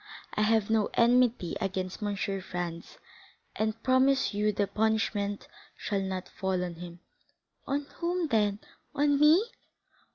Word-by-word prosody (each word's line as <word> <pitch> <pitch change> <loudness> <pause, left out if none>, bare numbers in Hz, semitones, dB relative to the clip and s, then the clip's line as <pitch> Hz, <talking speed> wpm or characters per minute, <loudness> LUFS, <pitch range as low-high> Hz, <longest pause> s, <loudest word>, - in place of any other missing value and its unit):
I - - -1
have 220 0 +2
no 220 -2 +2
enmity 240 -6 +3
against 190 -1 -3
M. 205 -1 -1
Franz, 180 -4 -4 0.6
and 220 +1 -2
promise 265 0 +3
you 210 +1 +1
the 205 0 0
punishment 210 -1 -1 0.3
shall 200 -2 -2
not 190 -1 -4
fall 190 -1 -2
on 175 -1 -4
him." 170 +1 -10 0.7
"On 285 +1 -1
whom, 345 -1 -1
then!—on 225 +6 0
me?" 310 +7 +6
210 Hz, 125 wpm, -29 LUFS, 190-250 Hz, 0.7 s, me